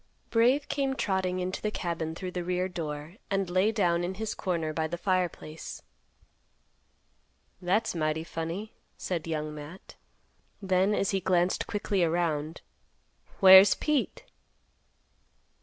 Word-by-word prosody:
Brave 255 Hz, +5 st, +3 dB
came 275 Hz, -2 st, -1 dB
trotting 190 Hz, -5 st, -1 dB
into 185 Hz, +1 st, -3 dB
the 215 Hz, -, 0 dB
cabin 165 Hz, -5 st, -3 dB
through 185 Hz, +1 st, -5 dB
the 180 Hz, -1 st, -3 dB
rear 180 Hz, +1 st, -1 dB
door, 160 Hz, -1 st, -6 dB
and 195 Hz, -1 st, 0 dB
lay 185 Hz, +4 st, +3 dB
down 175 Hz, -6 st, +1 dB
in 185 Hz, +2 st, -3 dB
his 220 Hz, +2 st, -3 dB
corner 165 Hz, -4 st, -2 dB
by 160 Hz, 0 st, -1 dB
the 175 Hz, +2 st, -4 dB
fireplace. 175 Hz, -4 st, -3 dB, 1.8 s
"That's 200 Hz, +5 st, +1 dB
mighty 155 Hz, -1 st, -1 dB
funny," 165 Hz, +6 st, -5 dB, 0.2 s
said 170 Hz, -3 st, -3 dB
Young 155 Hz, -1 st, -3 dB
Matt. 150 Hz, +5 st, -10 dB, 0.7 s
Then, 190 Hz, +1 st, +2 dB
as 195 Hz, -, 0 dB
he 195 Hz, -, +1 dB
glanced 180 Hz, -1 st, +1 dB
quickly 200 Hz, -2 st, 0 dB
around, 160 Hz, -2 st, -1 dB, 0.8 s
"Where's 190 Hz, +1 st, +9 dB
Pete?" 300 Hz, -3 st, -1 dB
180 Hz, 125 wpm, -28 LUFS, 165-195 Hz, 1.8 s, Where's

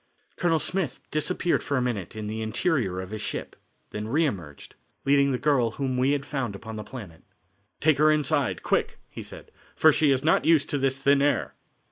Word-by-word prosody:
Colonel 170 Hz, -2 st, +2 dB
Smith 175 Hz, -2 st, -2 dB
disappeared 175 Hz, +3 st, 0 dB
for 140 Hz, -, -1 dB
a -, -, +1 dB
minute 110 Hz, -7 st, -3 dB
in 110 Hz, -1 st, -5 dB
the 110 Hz, +1 st, -4 dB
interior 110 Hz, -, 0 dB
of 95 Hz, +1 st, -9 dB
his 110 Hz, -1 st, -5 dB
ship, -, -, -4 dB, 0.4 s
then 105 Hz, +1 st, -4 dB
re 155 Hz, +8 st, +2 dB
emerged, 85 Hz, -, -6 dB, 0.3 s
leading 140 Hz, 0 st, +4 dB
the 130 Hz, -, 0 dB
girl 125 Hz, -4 st, +1 dB
whom 135 Hz, -2 st, -2 dB
we 130 Hz, +3 st, +2 dB
had 140 Hz, -1 st, -2 dB
found 135 Hz, -8 st, -3 dB
upon 110 Hz, +3 st, -8 dB
the 105 Hz, -, -5 dB
planet. 100 Hz, -12 st, -10 dB, 0.6 s
"Take 155 Hz, -2 st, +3 dB
her 155 Hz, 0 st, +6 dB
inside, 150 Hz, -2 st, +1 dB
quick," -, -, 0 dB
he -, -, -7 dB
said, -, -, -11 dB, 0.2 s
"for 160 Hz, -, +6 dB
she 150 Hz, 0 st, +2 dB
is 135 Hz, -1 st, +2 dB
not 160 Hz, -, +3 dB
used 160 Hz, -3 st, +3 dB
to 145 Hz, -, 0 dB
this 135 Hz, 0 st, +1 dB
thin 140 Hz, +1 st, +3 dB
air." 145 Hz, +1 st, +1 dB
135 Hz, 200 wpm, -26 LUFS, 110-150 Hz, 0.6 s, her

